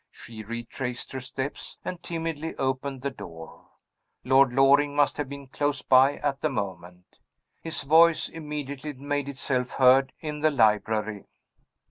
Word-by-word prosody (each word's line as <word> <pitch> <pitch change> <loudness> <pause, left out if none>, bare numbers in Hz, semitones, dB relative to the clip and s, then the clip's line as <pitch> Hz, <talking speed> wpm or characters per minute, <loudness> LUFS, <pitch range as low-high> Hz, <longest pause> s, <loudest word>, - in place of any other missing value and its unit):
She 110 -2 -11
retraced 120 +3 -5
her 130 - -4
steps, 130 +2 -6
and 180 -1 -5
timidly 165 -1 -4
opened 130 0 -2
the 140 - -1
door. 80 -9 -11 0.6
Lord 130 0 +5
Loring 140 +2 +4
must 145 -1 +2
have 145 -3 -3
been 140 0 -8
close 145 +2 -2
by 130 +2 +5
at 140 -2 -2
the 155 - +1
moment. 90 -6 -6 0.4
His 165 0 -3
voice 160 +3 +5
immediately 150 -2 -6
made 145 +1 -3
itself 130 -2 -2
heard 130 +1 +5
in 150 -1 -5
the 155 +1 +3
library. 110 -4 +1
135 Hz, 140 wpm, -26 LUFS, 125-145 Hz, 0.6 s, Lord